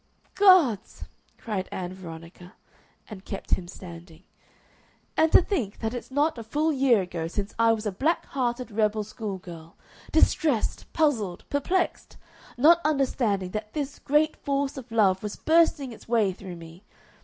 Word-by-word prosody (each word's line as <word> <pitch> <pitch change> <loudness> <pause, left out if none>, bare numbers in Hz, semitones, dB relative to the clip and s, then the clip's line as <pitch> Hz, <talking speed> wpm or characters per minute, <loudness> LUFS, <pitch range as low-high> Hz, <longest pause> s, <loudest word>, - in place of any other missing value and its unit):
"Gods!" 365 - +4 0.3
cried 205 -5 -4
Ann 180 -1 -5
Veronica, 175 +1 -11 0.5
and 200 -4 -10
kept 195 - -7
him 175 - 0
standing. 170 -1 -11 0.9
"And 320 0 +3
to - - +7
think 255 - -2
that 225 +1 -3
it's 245 - -6
not 290 0 0
a - - -6
full 300 +8 0
year 260 -7 +3
ago 170 -2 -4
since 200 +4 -4
I 230 0 +5
was 220 0 -4
a 210 - 0
black 300 - 0
hearted 245 -2 -2
rebel 215 0 +1
school 210 -2 -6
girl, 170 -3 -12 0.4
distressed, 285 -10 +1
puzzled, 225 - 0
perplexed, 345 +6 -1 0.4
not 330 +7 +6
understanding 245 -10 0
that 215 +1 -5
this 290 -1 -4
great 300 +2 +2
force 280 -1 -1
of 255 -3 -9
love 195 -4 +3
was 210 -1 -5
bursting 315 -5 +2
its 225 - -13
way 225 -4 +2
through 185 -1 -9
me! 165 +2 -13
225 Hz, 155 wpm, -26 LUFS, 190-280 Hz, 0.9 s, to